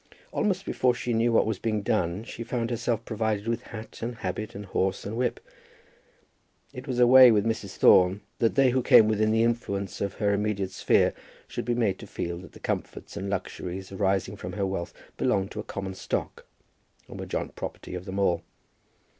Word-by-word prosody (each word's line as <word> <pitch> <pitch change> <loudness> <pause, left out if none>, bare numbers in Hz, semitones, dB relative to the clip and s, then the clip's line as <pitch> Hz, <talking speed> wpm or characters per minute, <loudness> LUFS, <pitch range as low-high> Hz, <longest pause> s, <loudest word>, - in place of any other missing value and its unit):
Almost 195 -2 0
before 125 -1 +2
she 120 0 -2
knew 115 +1 +2
what 115 - +4
was 110 -3 -2
being 110 -2 -1
done 90 +2 0
she 115 - -7
found 115 0 -2
herself 115 -1 -1
provided 110 -1 -1
with 115 +1 0
hat 110 -1 -9
and 120 +1 -3
habit 105 +1 -4
and 100 +1 -6
horse 95 0 -1
and 105 +3 -4
whip. 125 +1 0 1.3
It 130 +2 -8
was 130 -2 -2
a 125 - +6
way 130 0 +9
with 105 -1 +2
Mrs. 110 -4 -2
Thorne 95 +2 +5 0.2
that 115 - +2
they 135 -2 +5
who 130 +1 +2
came 110 -2 +7
within 110 0 +2
the 110 +1 +3
influence 100 -5 -2
of 100 -2 -2
her 100 -1 +1
immediate 100 -2 -1
sphere - - +3 0.3
should - - -5
be 120 - 0
made 105 -6 +1
to - - -9
feel 85 0 -4
that 95 - -13
the - - -13
comforts - - -4
and 100 - -4
luxuries 95 -1 -4
arising 95 -1 0
from 90 0 -6
her 100 0 -1
wealth 95 -3 -3 0.3
belonged 95 0 +1
to 105 - -6
a - - -3
common 95 -2 -5
stock, 95 - -4 0.6
and - - -9
were - - -4
the - - -14
joint - - -3
property - - -6
of 90 0 -5
them 95 +1 -5
all. 90 -4 +2
105 Hz, 205 wpm, -27 LUFS, 95-115 Hz, 1.3 s, way